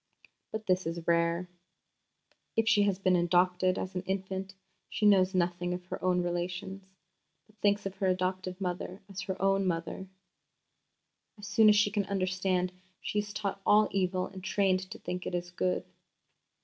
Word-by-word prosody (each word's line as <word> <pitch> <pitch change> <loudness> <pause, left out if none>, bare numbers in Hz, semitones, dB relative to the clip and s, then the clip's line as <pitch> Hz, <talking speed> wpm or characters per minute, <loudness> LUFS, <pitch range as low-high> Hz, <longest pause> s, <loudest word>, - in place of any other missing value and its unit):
But 220 0 -4
this 185 -3 +1
is 165 0 -4
rare. 170 +1 +2 1.1
If 225 0 +2
she 210 -3 +5
has 200 -2 +2
been 185 -1 +2
adopted 180 +1 +3
as 190 - -4
an 180 - -2
infant, 190 0 -3 0.3
she 210 - -1
knows 190 -2 +5
nothing 175 0 0
of 180 0 -8
her - - -6
own 180 -1 +2
relations, 180 +3 -3 0.6
but 215 0 -27
thinks 205 0 +2
of 195 - -3
her 195 - 0
adopted 185 0 -1
mother 180 0 -4
as 195 -1 -6
her 190 0 -4
own 195 0 +2
mother. 170 +2 -3 1.3
As 205 - -9
soon 215 0 +6
as 210 - +6
she 210 0 +3
can 205 -1 0
understand 185 -1 0 0.3
she 210 - -2
is 205 0 -4
taught 200 -2 -3
all 210 +2 +5
evil 185 -1 0
and 190 -1 -10
trained 195 -2 +2
to - - -7
think 180 0 -5
it - - -2
is 175 0 -3
good." 180 +1 -1
185 Hz, 170 wpm, -30 LUFS, 180-200 Hz, 1.3 s, soon